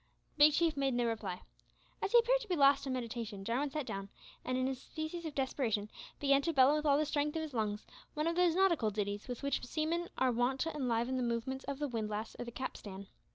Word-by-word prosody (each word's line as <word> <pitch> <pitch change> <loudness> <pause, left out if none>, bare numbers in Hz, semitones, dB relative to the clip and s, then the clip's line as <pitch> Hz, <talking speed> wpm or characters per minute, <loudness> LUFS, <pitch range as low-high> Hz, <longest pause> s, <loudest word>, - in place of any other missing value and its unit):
Big 300 0 +7
Chief 325 0 +2
made 275 -2 0
no 240 0 +1
reply. 210 -6 -3 0.6
As - - -1
he 480 - +7
appeared - - +4
to 450 - -8
be 365 - 0
lost 280 -1 +4
in 265 - -1
meditation, 230 -5 -4
Jarwin 255 +6 0
sat 300 0 -3
down, 195 -4 -5 0.3
and 255 0 -1
in 255 0 +1
a 265 - 0
species 315 +6 -6
of 310 - -5
desperation, 235 -6 -1 0.3
began 275 -1 +4
to 330 +4 -1
bellow 270 +1 +6
with 305 0 0
all 280 -1 +5
the 305 - +2
strength 295 +1 -1
of 320 - -1
his 305 -3 -6
lungs 210 -2 -2 0.3
one 305 0 0
of 335 0 +1
those 350 -2 +3
nautical 345 - +3
ditties 205 0 -3
with 245 +1 -6
which 280 -1 0
seamen 325 +6 -1
are 260 -1 +3
wont 245 +3 +1
to 325 - -1
enliven 250 -2 0
the - - 0
movements 245 +3 -2
of 280 - -3
the 295 +1 -1
windlass 220 -3 -3
or 245 - -3
the 235 - -7
capstan. 200 -6 -6
265 Hz, 235 wpm, -34 LUFS, 230-300 Hz, 0.6 s, Big